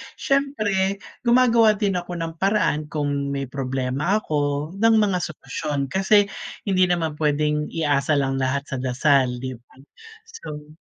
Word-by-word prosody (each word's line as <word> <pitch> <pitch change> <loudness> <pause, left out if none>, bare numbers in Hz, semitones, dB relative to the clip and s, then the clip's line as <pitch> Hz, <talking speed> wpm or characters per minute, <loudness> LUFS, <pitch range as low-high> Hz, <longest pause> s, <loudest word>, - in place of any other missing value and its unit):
siyempre, 210 -9 0 0.3
gumagawa 235 -3 +5
din 195 -3 0
ako 175 0 -7
ng 165 0 -4
paraan 190 -7 +1
kung 145 -2 -1
may 140 0 -2
problema 135 - -1
ako 145 0 -1
ng 225 +1 +5
mga 195 -3 +1
solusyon 145 -4 -4
kasi 200 +3 +4 0.4
hindi 185 -2 +3
naman 165 -3 -1
puwedeng 150 0 +1
iasa 150 -2 +1
lang 135 -1 -1
lahat 135 +1 0
sa - - -1
dasal 130 0 +2
di 130 - -3
ba? 120 - -26 0.6
So 150 - -9
155 Hz, 140 wpm, -23 LUFS, 140-195 Hz, 0.6 s, gumagawa